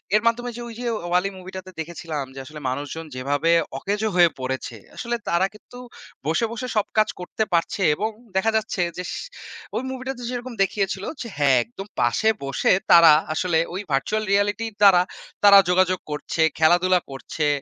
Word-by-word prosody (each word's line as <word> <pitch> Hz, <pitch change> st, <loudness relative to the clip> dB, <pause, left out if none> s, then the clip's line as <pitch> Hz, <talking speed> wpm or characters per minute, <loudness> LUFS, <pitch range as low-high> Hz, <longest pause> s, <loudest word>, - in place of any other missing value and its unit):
এর 215 Hz, -, +4 dB
মাধ্যমে 240 Hz, +1 st, 0 dB
যে -, -, -6 dB
ওই 235 Hz, -, -8 dB
যে 245 Hz, -, -5 dB, 0.3 s
'WALL·E' 180 Hz, +2 st, +2 dB
মুভিটাতে 185 Hz, 0 st, -9 dB
দেখেছিলাম 160 Hz, -3 st, -5 dB
যে, 135 Hz, -, -7 dB
আসলে 150 Hz, +2 st, -10 dB
মানুষজন 145 Hz, +5 st, -5 dB
যেভাবে 145 Hz, +5 st, 0 dB, 0.3 s
অকেজো 205 Hz, +6 st, -1 dB
হয়ে 175 Hz, -1 st, +6 dB
পড়েছে, 130 Hz, -2 st, -4 dB, 0.2 s
আসলে 240 Hz, -1 st, -3 dB
তারা 170 Hz, +2 st, +3 dB
কিন্তু 245 Hz, +3 st, -14 dB, 0.5 s
বসে, 165 Hz, +9 st, +1 dB
বসে 245 Hz, +2 st, -5 dB
সব 210 Hz, -, +2 dB
কাজ 215 Hz, 0 st, +4 dB
করতে 180 Hz, +4 st, -2 dB
পারছে 170 Hz, +3 st, 0 dB
এবং 215 Hz, +7 st, -1 dB, 0.3 s
দেখা 190 Hz, +4 st, +2 dB
যাচ্ছে 220 Hz, -3 st, -2 dB, 0.2 s
যেস 180 Hz, -1 st, -4 dB, 0.6 s
ওই -, -, -1 dB
মুভিটাতে 260 Hz, -1 st, -5 dB
যেরকম 250 Hz, 0 st, -5 dB
দেখিয়েছিল 195 Hz, -1 st, -2 dB, 0.2 s
যে, 235 Hz, -, -5 dB
হ্যাঁ! 140 Hz, -3 st, +4 dB
একদম 205 Hz, -4 st, -10 dB
পাশে 120 Hz, -, +2 dB, 0.2 s
বসে 135 Hz, -, +1 dB, 0.2 s
তারা 170 Hz, -2 st, +9 dB, 0.2 s
আসলে 165 Hz, 0 st, +1 dB
ওই 190 Hz, -, -3 dB
virtual 210 Hz, +11 st, 0 dB
reality 205 Hz, +2 st, +1 dB
র -, -, -21 dB
দ্বারা 195 Hz, -3 st, +7 dB, 0.4 s
তারা 200 Hz, -1 st, +9 dB
যোগাযোগ 185 Hz, 0 st, +3 dB
করছে, 150 Hz, +2 st, -3 dB, 0.2 s
খেলাধুলা 175 Hz, +3 st, +4 dB
করছে। 150 Hz, +3 st, -3 dB
185 Hz, 165 wpm, -23 LUFS, 160-215 Hz, 0.6 s, তারা